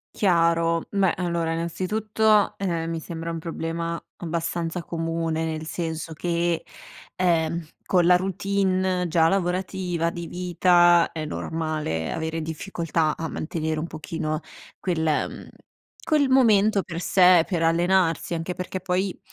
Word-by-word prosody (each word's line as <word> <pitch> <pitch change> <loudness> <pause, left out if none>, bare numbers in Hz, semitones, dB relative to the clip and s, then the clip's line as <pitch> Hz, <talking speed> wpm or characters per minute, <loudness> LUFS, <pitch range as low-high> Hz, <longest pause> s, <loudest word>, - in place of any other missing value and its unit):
Chiaro, 165 -3 +2
meh, 195 -3 +3
allora 170 -2 -1
innanzitutto, 210 +5 +1
ehm, 170 -4 -1
mi 165 0 -3
sembra 165 +1 -5
un 165 - -4
problema 165 0 -3 0.2
abbastanza 170 0 -3
comune, 165 -1 -2
nel 160 -1 -3
senso 165 -1 -4
che, 170 +1 -1 0.5
ehm, 170 -2 +1 0.2
con 180 -2 +2
la 180 +1 +6
routine 185 -1 0
già 160 0 +3
lavorativa, 180 -2 -1
di 170 -1 -6
vita, 175 -1 +4
è 155 -1 -4
normale 155 - -3
avere 160 0 -3
difficoltà 160 -1 -2
a 165 - -3
mantenere 155 -1 -3
un 165 - -3
pochino 155 -1 -4 0.4
quel 175 -4 -1
mhmm, 155 -2 -1 0.6
quel 295 -4 +2
momento 215 -6 +4
per 170 -1 -6
sé, 180 -3 +5
per 170 -3 0
allenarsi. 170 0 +2
Anche 165 +2 -3
perché 180 0 -5
poi 185 +1 -1
170 Hz, 125 wpm, -24 LUFS, 165-185 Hz, 0.6 s, la